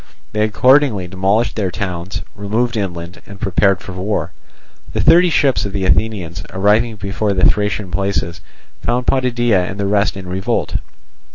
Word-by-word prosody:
They 105 - -1
accordingly 125 -2 +3
demolished 100 +5 0
their 100 -4 -1
towns, 90 +1 -4
removed 110 +4 -1
inland 90 -4 -4
and 100 -1 -11
prepared 95 0 +2
for 100 - -8
war. 95 -2 -2 0.6
The - - -2
thirty 175 +2 +6
ships 140 -4 +2
of 100 - -4
the 100 -2 -1
Athenians, 90 -3 0
arriving 105 +4 +2
before 100 +1 -2
the 95 -1 +3
Thracian 105 -2 -1
places, 90 -1 -2 0.4
found 125 +1 -1
Potidæa 120 -7 +1
and 95 - -7
the 100 - 0
rest 100 0 +1
in 95 -1 -8
revolt. 95 +2 -1
100 Hz, 155 wpm, -18 LUFS, 95-110 Hz, 0.6 s, thirty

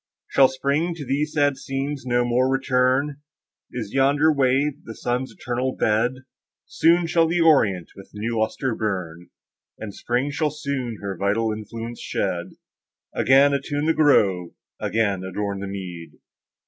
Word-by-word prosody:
Shall 135 -1 +6
Spring 140 +6 -1
to 150 -4 -7
these 145 +4 -1
sad 145 -2 +2
scenes 135 0 -4
no 120 0 +2
more 125 +2 +2
return? 135 +2 +1 0.5
Is 110 -5 -5
yonder 145 +4 +3
wave 140 +2 +1
the 110 - -9
sun's 125 +2 -2
eternal 125 +1 -3
bed?— 120 +5 0 0.4
Soon 170 +1 +3
shall 165 0 +3
the 170 +2 0
orient 105 - +3
with 95 - -13
new 115 +2 -3
lustre 115 +3 -1
burn, 90 -6 -4 0.5
And 105 -2 -7
Spring 125 +7 -1
shall 150 +1 0
soon 140 -6 -4
her 100 -1 -3
vital 105 +4 0
influence 115 +2 -7
shed, - - -3 0.6
Again 135 +2 +5
attune 145 +1 -1
the 160 - +3
grove, 95 - +3 0.3
again 100 -4 0
adorn 100 +1 -3
the 100 - -5
mead! 90 -4 -7
130 Hz, 145 wpm, -23 LUFS, 110-145 Hz, 0.6 s, Shall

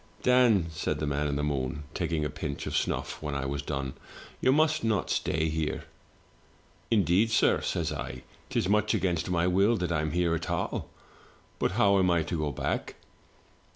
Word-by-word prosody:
*Dan,' 125 -8 +5
said 75 -1 -2
the 75 - -2
man 75 0 0
in 70 - -1
the 75 - -1
moon, 70 0 -2
taking 80 -2 -1
a - - -1
pinch 75 -1 -5
of - - -4
snufif - - -1
when 75 -2 -3
I 70 0 -2
was 70 +1 -2
done, 70 -2 -3 0.5
'you 130 - +3
must 155 +2 +3
not 110 -3 0
stay 80 0 0
here.' 80 -1 -2 0.6
" - - -33
'Indeed, 100 0 +3
sir,' 110 - +3
says - - -1
I, 65 - -6
* - - -29
'tis - - 0
much 105 +1 +2
against 90 -2 0
my 85 -1 +1
will 100 +6 +3
that 90 -2 -2
I'm 80 -1 0
here 85 +1 +1
at 85 0 -3
all; - - -2 0.7
but - - +1
how 100 -2 +4
am 90 -1 +3
I 85 -2 +3
to 85 +1 -3
go 75 -1 -1
back?' - - -3
85 Hz, 190 wpm, -28 LUFS, 75-100 Hz, 0.7 s, Dan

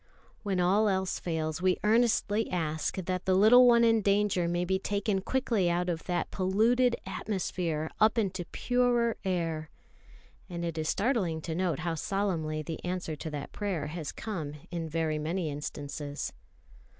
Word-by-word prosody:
When 195 -3 -1
all 200 +4 +3
else 190 -1 -1
fails, 160 -1 -2
we 185 -1 +3
earnestly 220 -1 +2
ask 160 -3 -1
that 185 -1 -3
the 185 - +3
little 240 +6 +7
one 235 -1 +6
in 225 -1 +4
danger 200 -3 +2
may 175 +1 0
be 190 +1 0
taken 200 0 -1
quickly 225 -6 +1
out 175 +1 0
of 165 -2 -3
that 175 -1 -1
polluted 230 +6 +2
atmosphere 175 -6 -2
up 215 +2 +4
into 190 -5 -1
purer 245 +1 +1
air; 165 -4 -2 0.8
and 170 -1 -4
it 165 -1 -3
is 155 - -1
startling 200 -8 0
to 160 - -4
note 175 -1 -1
how 170 0 -1
solemnly 165 -4 -1
the 160 +1 -6
answer 180 -3 -3
to 160 - -5
that 145 -2 -6
prayer 195 -7 -2
has 155 -1 -5
come 160 -10 -5 0.2
in 165 -2 -3
very 155 -1 -1
many 160 +1 -2
instances. 145 0 -5
185 Hz, 160 wpm, -29 LUFS, 160-205 Hz, 0.8 s, little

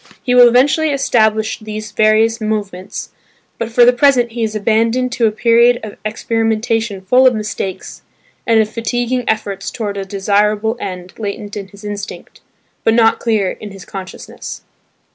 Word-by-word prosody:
He 250 - 0
will 245 -1 +8
eventually 275 +6 +3
establish 220 -6 +1
these 215 -1 -7
various 220 +2 +2
movements, 205 -3 -4 0.5
but 230 - -2
for 240 +1 +5
the 245 - +6
present 245 -2 +3
he 235 +1 -5
is 220 -1 -1
abandoned 230 +4 +1
to 235 -2 +2
a - - +1
period 235 +2 +4
of 215 -2 -7
experimentation 225 -1 -1
full 250 +7 +4
of 250 - +3
mistakes, 210 -3 -5 0.5
and 225 -1 +4
of 220 - +3
fatiguing 245 +3 -2
efforts 200 -3 -2
towards 205 -4 -4
a - - -3
desirable 210 +3 +1
end 180 -3 -6
latent 205 -1 -5
in 200 -2 -6
his 200 +1 -16
instinct, 205 0 -7 0.4
but 225 - +3
not 225 -1 +4
clear 215 -5 0
in 210 - -9
his 195 -2 -11
consciousness. 190 -1 -8
220 Hz, 160 wpm, -16 LUFS, 205-235 Hz, 0.5 s, will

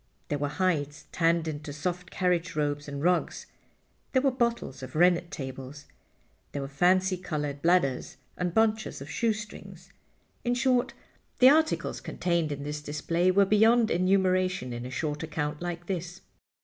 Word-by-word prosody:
There 145 - -1
were 145 - 0
hides 150 -3 -1
tanned 165 -1 +2
into 150 -1 -5
soft 175 +4 -4
carriage 180 -2 0
robes 145 -1 -1
and 140 0 -5
rugs; 180 +1 +1 0.7
there 260 - +4
were 275 - +4
bottles 235 - -1
of 130 - -9
rennet 175 +1 +4
tablets; 135 +1 -7 0.7
there 140 - -3
were - - -4
fancy 185 +6 +2
colored 150 -5 -4
bladders, 155 -7 +1 0.2
and 180 -1 -1
bunches 220 +2 +1
of 140 +2 -8
shoestrings. 215 0 -4 0.5
In 245 0 +1
short, 250 -1 +1 0.4
the 255 +1 +8
articles 315 +1 +1
contained 170 -3 -1
in 140 -1 -4
this 150 +1 -4
display 165 +4 0
were 195 +2 +5
beyond 220 +3 +4
enumeration 185 -6 +1
in 120 +1 -5
a - - -7
short 150 +2 -3
account 150 -1 -3
like 175 -1 -4
this. 180 -1 -4
170 Hz, 150 wpm, -28 LUFS, 145-190 Hz, 0.7 s, the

